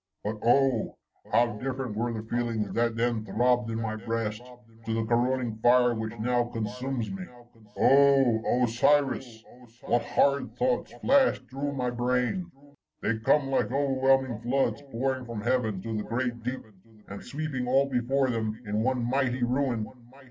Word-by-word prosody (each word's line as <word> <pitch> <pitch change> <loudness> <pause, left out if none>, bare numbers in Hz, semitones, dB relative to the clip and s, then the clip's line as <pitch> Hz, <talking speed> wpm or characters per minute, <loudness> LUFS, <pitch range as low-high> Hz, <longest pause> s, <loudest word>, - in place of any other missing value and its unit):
But, 105 +1 -3
oh! 125 0 +2 0.3
how 120 -3 +2
different 130 -3 -4
were 120 +2 -1
the 110 -1 -6
feelings 115 -4 -2
that 115 -1 +1
then 115 -1 0
throbbed 125 +1 +1
in 115 0 -2
my 110 -1 -3
breast, 110 0 -3 0.5
to 110 - 0
the 115 0 -1
corroding 120 0 0
fire 125 0 +5
which 110 0 -5
now 120 +2 +1
consumes 120 +2 -4
me! 195 -1 -5 0.3
— 105 -2 -22
Oh! 135 -3 +4
Osiris! 125 -1 +1 0.4
what 120 - +1
horrid 140 0 +1
thoughts 255 0 0
flash 270 - +4
through 140 +2 -4
my 125 -2 -1
brain! 125 +9 -1 0.3
— - - -35
^they 110 0 -1
come 135 +2 +3
like 135 - +1
overwhelming 135 -3 +2
floods 135 +3 0
pouring 130 +2 -1
from 115 -3 -6
heaven 110 -5 0
to 115 -1 -4
the 105 - -2
great 120 0 -2
deep, 125 +3 -4 0.4
and 100 0 -8
sweeping 140 -4 -4
all 135 +2 +3
before 130 +1 +1
them 110 -2 -2
in 105 +1 -1
one 125 0 0
mighty 130 -1 0
ruin. 125 -3 0
120 Hz, 155 wpm, -27 LUFS, 115-135 Hz, 0.5 s, fire